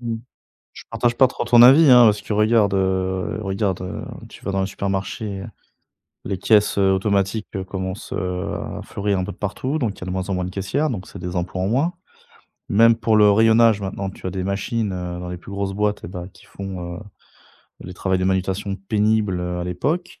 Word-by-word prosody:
Mmh 115 -1 -3
mh. 115 - -5 0.5
Je - - -12
partage 120 -1 0
pas 130 - +6
trop 130 - -4
ton 120 -1 +6
avis 140 +4 +8
hein! 125 -1 +8
Parce 105 -2 +3
que 105 - -5
regardes 105 -1 +3
heu 95 0 -1
regarde 95 -2 -1
heu, 90 - -5 0.2
tu - - -15
vas 100 - -2
dans 95 - 0
le 95 - 0
supermarché, 100 +1 -3 0.8
les 100 -1 -2
caisses, 105 +2 +3
heu, 95 -1 +4
automatiques 100 +2 0 0.2
commencent, 95 +2 -5
heu, 90 -2 -3
à - - -5
fleurir 100 -1 -2
un 90 - -1
peu 100 - -5
de - - -17
partout, 130 +9 -3
donc 115 -8 -2
il - - -15
y - - -5
a - - -9
de - - -4
moins 95 +1 -3
en - - 0
moins 90 0 -1
de 90 - -4
caissières, 115 +11 -1
donc 95 -6 -5
c'est - - -10
des 90 0 -5
emplois 90 +1 -2
en 95 - 0
moins. 140 +10 +1 0.8
Même 115 +3 +5
pour 115 -1 +2
le 105 -1 +6
rayonnage, 110 0 +5
maintenant 95 0 -4
tu 95 - -10
as 95 - -2
des 95 +1 -4
machines, 100 +2 -2
heu, 90 -1 -5
dans 90 - -6
les 90 - -5
plus 95 - -11
grosses 100 0 -2
boîtes 105 0 -1
et - - -6
bah, 90 -1 -7
qui - - -19
font, 90 -3 -7
heu, - - -9 0.8
les 90 - -8
travails 95 +1 -1
de 95 - 0
manutention 95 +1 -1
pénible, 105 -1 0
heu, 90 0 -3
à 90 - -3
l'époque, 155 - -3
100 Hz, 225 wpm, -21 LUFS, 95-110 Hz, 0.8 s, avis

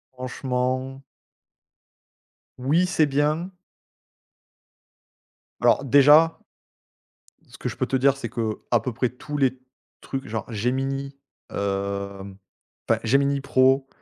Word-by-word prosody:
Franchement. 130 +1 -3 1.6
Oui 150 +8 +2
c'est 170 -3 +2
bien. 150 +5 0 2.1
Alors - - +4
déjà, 145 +5 +6 1.1
ce - - -15
que - - -3
je - - -6
peux - - -1
te 135 - 0
dire, 135 +1 +3
c'est 135 - -5
qu'à 115 0 -1
peu 125 - -4
près 120 +2 -1
tous 145 +4 -7
les 130 -2 +1 0.4
trucs 135 0 -5
genre 110 +1 -5
Gemini, 135 +5 -2 0.3
hem, 100 0 -4 0.5
enfin 115 -1 +2
Gemini 140 +4 +2
Pro, 135 0 +3
130 Hz, 105 wpm, -24 LUFS, 120-140 Hz, 2.1 s, déjà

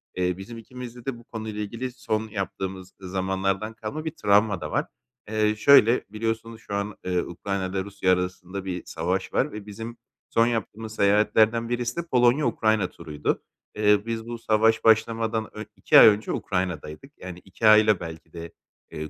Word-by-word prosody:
Eee, 90 0 0
bizim 115 +5 -9
ikimizde 125 +1 -10
de 135 -3 -3
bu 120 - -15
konuyla 110 -2 -6
ilgili 115 +5 -4
son 110 -3 -3
yaptığımız 95 -2 -5
zamanlardan 95 +3 -2
kalma 145 +9 -6
bir 160 - -2
travma 105 - +2
da 75 - -5
var. - - 0 0.4
Eee, 110 0 +1
şöyle, 120 0 +6
biliyorsunuz 115 +1 -4
şu 100 - -5
an, 100 0 -3
eee, 90 -1 +1
Ukrayna’yla 95 +1 -3
Rusya 100 -2 +1
arasında 90 +1 -4
bir 90 -2 -4
savaş 95 +3 -2
var 150 - +1
ve 105 -1 -8
bizim 115 +3 -8 0.3
son 115 +1 +3
yaptığımız 110 -1 -4
seyahatlerden 110 +3 +3
birisi 120 0 -2
de - - +1
Polonya 125 +2 +4
Ukrayna 110 -4 +1
turuydu. 75 -3 -3 0.3
Eee, 105 -1 +4
biz 115 -1 -4
bu 120 0 -5
savaş 110 0 +2
başlamadan 115 0 +2
ön 105 0 -7
2 95 - +6
ay - - +10
önce 105 0 +3
Ukrayna’daydık. 90 - -3
Yani, 90 -1 -8
2 95 +4 -2
ayla 110 -2 +6
belki 80 -1 -9
de, 85 -1 -8 0.4
eee, 75 0 -6
105 Hz, 165 wpm, -25 LUFS, 95-115 Hz, 0.4 s, ay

